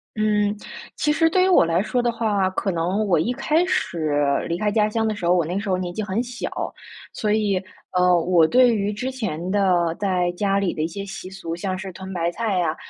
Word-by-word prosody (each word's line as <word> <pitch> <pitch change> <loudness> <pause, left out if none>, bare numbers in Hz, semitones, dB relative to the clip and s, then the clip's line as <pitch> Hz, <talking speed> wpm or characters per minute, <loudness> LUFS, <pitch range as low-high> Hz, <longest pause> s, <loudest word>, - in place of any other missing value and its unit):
嗯， 210 -1 +1 0.4
其 300 - +1
实 325 +1 +3
对 365 +2 +3
于 - - +3
我 365 - +6
来 165 +2 +1
说 245 +3 0
的 240 -1 +1
话， 210 -5 0
可 195 +1 -1
能 180 +5 0
我 180 -5 +2
一 230 +10 0
开 310 +6 +1
始 160 - -1 0.4
离 170 - -1
开 210 +2 0
家 210 0 +2
乡 225 +1 0
的 215 - 0
时 190 - -5
候， 175 - +5
我 170 - +2
那 180 +5 -2
时 205 0 -5
候 185 - +2
年 180 -1 -4
纪 215 - -3
很 205 +2 -1
小， 245 +1 -5 0.6
所 210 -1 -1
以， 205 -3 +1 0.3
呃， 180 -1 +4
我 170 -1 +4
对 250 +1 +5
于 205 0 -1
之 250 +6 -3
前 185 -8 -4
的 180 -4 +2
在 180 -3 +1
家 195 +2 0
里 200 -3 0
的 155 - -4
一 160 - 0
些 200 +4 -6
习 195 -1 -8
俗， 170 -4 -6
像 185 +1 -3
是 190 0 -6
屯 190 +1 -9
白 170 -1 -1
菜 215 -1 -1
呀， 165 -3 0
195 Hz, 250 characters per minute, -22 LUFS, 175-215 Hz, 0.6 s, 我